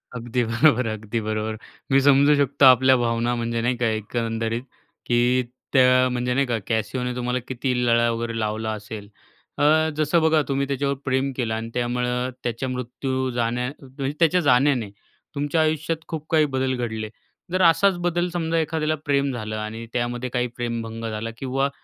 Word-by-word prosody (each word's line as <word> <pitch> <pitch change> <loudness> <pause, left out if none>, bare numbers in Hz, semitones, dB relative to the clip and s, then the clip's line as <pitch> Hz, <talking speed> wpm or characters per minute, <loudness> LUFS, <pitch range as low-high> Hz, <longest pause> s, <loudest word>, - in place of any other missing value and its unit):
अगदी 120 +1 -1
बरोबर 120 +1 +3
अगदी 110 +1 -3
बरोबर. 110 0 -3 0.3
मी 135 - +6
समजू 140 +1 +5
शकतो 140 -1 +3
आपल्या 130 0 +7
भावना 120 0 0
म्हणजे 115 0 -2
नाही 120 +2 +1
का, 120 - 0
एकंदरीत. 115 +1 -2 0.4
की 120 - +1 0.6
त्या 130 -1 +5
म्हणजे 125 0 -1
नाही 140 +2 +2
का, 120 -2 0
कॅसियोने 125 +3 -2
तुम्हाला 125 0 -1
किती 130 0 -2
लळा 120 0 +3
वगैरे 115 0 -3
लावला 110 0 -2
असेल. 105 -1 -8 0.5
अ, 155 +2 +4
जसं 155 +2 +2
बघा, 160 -1 +4
तुम्ही 140 0 0
त्याच्यावर 140 0 -1
प्रेम 130 +1 0
केलं 120 -4 -1
आणि 115 +1 -4
त्यामुळं 125 +1 -1
त्याच्या 120 +2 -2
मृत्यू, 130 +1 -3
जाण्या 120 +1 0
म्हणजे 135 +1 -5
त्याच्या 175 +2 +4
जाण्याने, 125 -4 +3 0.5
तुमच्या 145 +3 0
आयुष्यात 155 +1 0
खूप 155 -2 -5
काही 155 -2 +4
बदल 130 0 0
घडले. 110 -3 -3 0.4
जर 185 +1 +1
असाच 180 +3 +4
बदल 175 0 +1
समजा 165 -1 -1
एखाद्याला 155 0 0
प्रेम 140 -1 +1
झालं 110 -3 -4
आणि 110 +2 -5
त्यामध्ये 120 +1 -2
काही 125 0 -1
प्रेमभंग 115 -1 -4
झाला 110 +1 -4
किंवा 135 +2 -1
125 Hz, 160 wpm, -23 LUFS, 115-140 Hz, 0.6 s, आपल्या